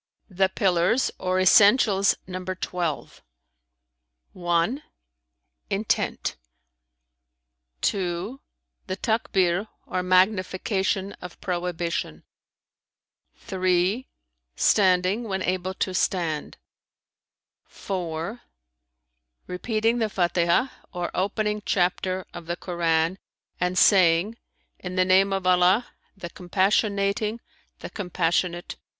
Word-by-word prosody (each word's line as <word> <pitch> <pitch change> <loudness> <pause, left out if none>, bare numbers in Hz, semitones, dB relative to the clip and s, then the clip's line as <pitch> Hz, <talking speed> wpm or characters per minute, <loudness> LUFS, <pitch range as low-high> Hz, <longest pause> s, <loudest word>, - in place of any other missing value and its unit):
The 190 +1 +2
pillars 190 +6 +2
or 185 0 0
essentials 200 +1 +5
number 185 0 -5
twelve: 175 -4 -4 1.1
(1) 175 - 0 0.9
intent; - - -1 1.4
(2) 190 +7 -2 0.5
the 185 0 -3
Takbνr 195 -4 0 0.2
or 185 - -2
magnification 190 +1 +1
of 180 -2 -9
prohibition; 175 - -3 1.1
(3) 185 +6 0 0.5
standing 190 +2 +3
when 190 -3 -2
able 185 +1 -2
to 190 - -1
stand[FN#312]; 170 -4 -1 1.1
(4) 180 +3 -5 1.0
repeating 220 +5 -1
the 220 - +1
Fatihah 175 +6 +1 0.2
or 175 -2 -4
opening 210 +2 -1
chapter 185 0 0
of 175 -2 -9
the 175 - -2
Koran 170 0 0 0.4
and 180 +1 0
saying, 185 +3 +4 0.4
'In 180 0 -6
the 185 0 +3
name 190 +2 +4
of 195 -1 -2
Allah, 185 +5 +4 0.3
the 175 -3 -7
Compassionating, 200 +3 0 0.4
the - - -7
Compassionate!' 175 -2 -1
185 Hz, 85 wpm, -25 LUFS, 175-200 Hz, 1.4 s, essentials